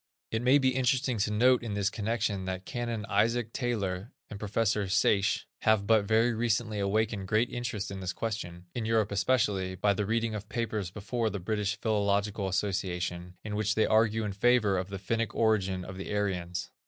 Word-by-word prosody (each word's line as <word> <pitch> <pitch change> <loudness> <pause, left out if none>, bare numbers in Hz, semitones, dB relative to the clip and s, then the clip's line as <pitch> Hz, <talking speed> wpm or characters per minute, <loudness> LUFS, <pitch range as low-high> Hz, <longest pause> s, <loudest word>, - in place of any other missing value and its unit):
It 110 - 0
may 130 +3 +5
be 130 -2 +3
interesting 130 -1 +1
to 105 +2 +1
note 125 +4 +4
in 110 -4 -4
this 100 0 0
connection 105 -3 -1
that 95 0 -4
Canon 120 -3 -3
Isaac 115 +2 +1
Taylor, 105 -4 -2 0.2
and 100 - -6
Professor 105 -1 0
Sayce 100 0 +2
have 110 -2 +3
but 110 -1 +4
very 115 +3 +3
recently 115 -1 0
awakened 100 0 0
great 110 +5 +2
interest 115 -5 -3
in 100 - -5
this 95 -1 -3
question, 90 -7 -5
in 115 -2 -3
Europe 110 -2 +2
especially, 100 -4 +1
by 100 +2 +2
the 100 0 -2
reading 115 0 0
of 105 0 -6
papers 110 -5 -2
before 110 +4 -2
the 100 -1 -4
British 105 +2 -2
Philological 100 -2 0
Association, 90 -2 -2
in 105 -1 -4
which 105 0 0
they 110 - +3
argue 110 0 +3
in 105 -2 -3
favor 110 -1 +3
of 90 0 -2
the 100 - -5
Finnic 115 +4 -2
origin 95 -5 +1
of 95 0 -8
the 95 - -5
Aryans. 90 -4 -2
105 Hz, 185 wpm, -29 LUFS, 100-115 Hz, 0.2 s, may